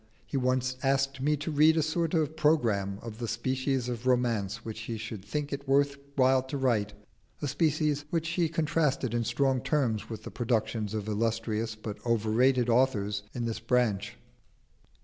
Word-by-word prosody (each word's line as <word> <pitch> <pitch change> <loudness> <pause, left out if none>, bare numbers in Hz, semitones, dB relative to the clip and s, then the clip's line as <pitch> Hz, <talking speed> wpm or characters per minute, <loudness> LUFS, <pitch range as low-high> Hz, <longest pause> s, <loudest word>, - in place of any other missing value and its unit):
He - - -7
once 130 0 +1
asked 135 0 +1
me 150 +2 +2
to 155 +3 -4
read 155 +2 +5
a 160 - +3
sort 165 +2 0
of 155 -1 0
programme 115 -11 +2
of 115 -1 -8
the 120 - -3
species 130 +2 -1
of 120 0 -4
romance 115 -4 +1
which 110 -1 -5
he 115 0 -4
should 110 -2 -6
think 145 +8 -3
it 140 0 -5
worth 140 +1 +3 0.2
while 130 -1 +4
to 130 +2 -5
write 115 -6 +1 0.5
a 145 - -2
species 150 0 +1
which 165 0 -1
he 170 -1 +1
contrasted 155 -6 0
in 120 0 +1
strong 130 +3 +1
terms 125 -8 0
with 110 -1 -6
the - - -7
productions 110 -3 -1
of 105 -1 -3
illustrious 110 0 -1
but 110 -1 -7
overrated 120 +2 +2
authors 110 -5 +2
in 120 -1 -2
this 115 -1 -2
branch. 115 -6 0
125 Hz, 170 wpm, -29 LUFS, 110-140 Hz, 0.5 s, read